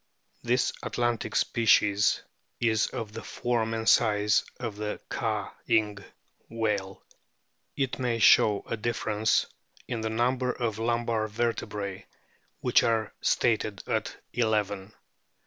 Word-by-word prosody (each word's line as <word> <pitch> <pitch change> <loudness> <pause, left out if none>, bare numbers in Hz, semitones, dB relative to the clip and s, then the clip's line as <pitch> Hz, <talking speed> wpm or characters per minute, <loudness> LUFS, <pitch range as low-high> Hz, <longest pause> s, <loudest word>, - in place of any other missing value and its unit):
This 125 +1 +1
Atlantic 120 -2 -1
species 105 -3 +3 0.4
is 110 -2 +2
of 115 -5 -6
the 115 - -6
form 115 -2 -1
and 110 0 -3
size 105 -2 +4 0.2
of 115 -4 -4
the 105 0 -4
Caa'ing 105 -2 -1 0.5
whale. 105 -4 -2 0.7
It 135 -2 -1
may 120 -2 0
show 105 -1 +5
a - - -3
difference 110 -1 +1 0.4
in 120 -2 -3
the 110 - -1
num 120 +3 +1
ber 125 -1 0
of 115 -4 -2
lumbar 115 -1 0
vertebrae, 105 -3 -3 0.5
which - - +4
are 110 -2 0
stated 110 -4 0
at - - -2 0.2
eleven. 105 -4 0
110 Hz, 115 wpm, -28 LUFS, 105-120 Hz, 0.7 s, show